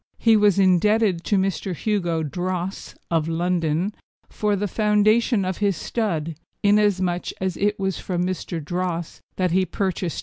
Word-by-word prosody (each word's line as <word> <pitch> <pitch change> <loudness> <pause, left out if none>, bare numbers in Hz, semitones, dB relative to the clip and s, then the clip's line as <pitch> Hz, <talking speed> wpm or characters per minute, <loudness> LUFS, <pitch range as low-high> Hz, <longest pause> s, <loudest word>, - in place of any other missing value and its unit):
He 225 -1 +4
was 205 -3 +4
indebted 195 0 +3
to 205 - +2
Mr. 190 -1 -1
Hugo 175 -4 -1
Droesse, 180 +4 -4 0.2
of 165 -2 +1
London, 170 +2 0 0.4
for 210 -1 0
the 205 +1 -1
foundation 215 +1 +2
of 185 -1 -3
his 200 -4 +1
stud, 165 -9 -2 0.3
inasmuch 200 -4 +2
as 190 -2 -2
it 205 +1 0
was 190 -2 -1
from 180 -1 -2
Mr. 185 -2 -3
Droesse 175 +1 -3 0.2
that 185 -2 0
he 190 +2 +3
purchased 185 -2 -2
Ch. - - -3
185 Hz, 155 wpm, -23 LUFS, 175-205 Hz, 0.4 s, He